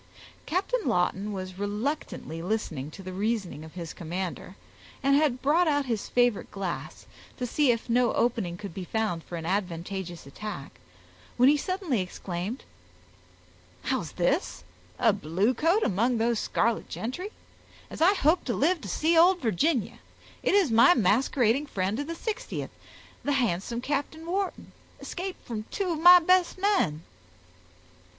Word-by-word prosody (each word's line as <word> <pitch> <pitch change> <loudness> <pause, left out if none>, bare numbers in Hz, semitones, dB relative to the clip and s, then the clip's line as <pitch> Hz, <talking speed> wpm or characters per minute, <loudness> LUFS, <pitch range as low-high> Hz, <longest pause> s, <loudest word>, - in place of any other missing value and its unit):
Captain 390 +9 0
Lawton 190 +3 +1
was 185 -1 -6
reluctantly 205 - -3
listening 170 -8 -2
to 195 +5 -11
the 185 0 -6
reasoning 200 -5 -2
of 160 +1 -12
his 170 -2 -6
commander, 180 +2 -5 0.5
and 275 +1 +4
had 280 -4 +2
brought 325 +5 +4
out 290 -2 +2
his 230 -5 -3
favorite 245 -3 +2
glass, 195 -3 -5 0.3
to 250 - -2
see 285 +3 +2
if 230 -1 -2
no 240 0 +3
opening 225 -8 0
could 200 -3 -7
be 190 - -5
found 205 -4 -2
for 175 - -8
an 165 -1 -5
advantageous 180 -2 -3
attack, 140 0 -7 0.7
when 250 +2 +6
he 295 - +5
suddenly 345 - -1
exclaimed,— 185 +5 -5 1.2
"How's 245 - -2
this! 275 - 0 0.3
a 225 -4 +4
bluecoat 225 - +1
among 230 +5 +1
those 230 0 +1
scarlet 230 +1 0
gentry? 265 - -4 0.6
As - - -7
I 375 +5 +6
hope 330 0 +3
to 240 - -1
live 335 +3 +2
to 200 - -7
see 320 - +2
old 355 +3 +6
Virginia, 245 - 0 0.4
it - - +2
is 380 - +4
my 235 +11 +7
masquerading 240 +5 +2
friend 195 +1 -1
of 290 - -3
the 335 - -3
60th, 440 +7 -4 0.5
the 285 - +1
handsome 235 -2 0
Captain 290 +4 -3
Wharton, 380 +2 -3 0.3
escaped 375 +1 -6
from 215 -3 -5
two 390 -3 -2
of 320 - -2
my 355 +2 +10
best 365 +1 +3
men!" 370 - +1
235 Hz, 150 wpm, -27 LUFS, 190-305 Hz, 1.2 s, my